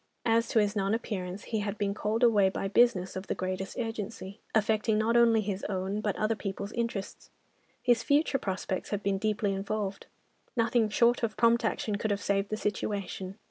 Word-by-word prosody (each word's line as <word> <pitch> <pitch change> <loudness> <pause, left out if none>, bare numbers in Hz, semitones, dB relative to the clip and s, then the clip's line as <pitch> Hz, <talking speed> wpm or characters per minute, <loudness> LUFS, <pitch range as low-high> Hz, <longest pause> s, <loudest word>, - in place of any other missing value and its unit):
As 230 0 +3
to - - -1
his 210 -1 +3
non 200 +1 +1
appearance, 195 -4 -4
he 220 - -2
had 205 0 -3
been 200 -1 0
called 215 +3 -1
away 210 -5 +5
by 195 - -3
business 200 -3 +3
of 190 +1 -5
the - - -1
greatest 185 +1 -4
urgency, 215 -4 -5 0.2
affecting 215 0 +2
not 220 +2 +2
only 230 -2 +5
his 200 -1 -3
own 195 +1 -2
but 210 -2 -1
other 215 +1 +1
people's 200 -1 -5
interests. 230 -5 -4 0.5
His 240 -3 +4
future 285 -1 +2
prospects 190 -1 -3
had 205 -1 -2
been 195 -1 0
deeply 210 -1 0
involved. 200 0 -3 0.5
Nothing 230 -1 +2
short 235 +3 +3
of 230 -2 -2
prompt 235 0 +4
action 215 -1 -1
could 220 - -2
have 200 -1 0
saved 200 +1 0
the 215 - -2
situation. 200 -2 -3
210 Hz, 185 wpm, -29 LUFS, 195-225 Hz, 0.5 s, away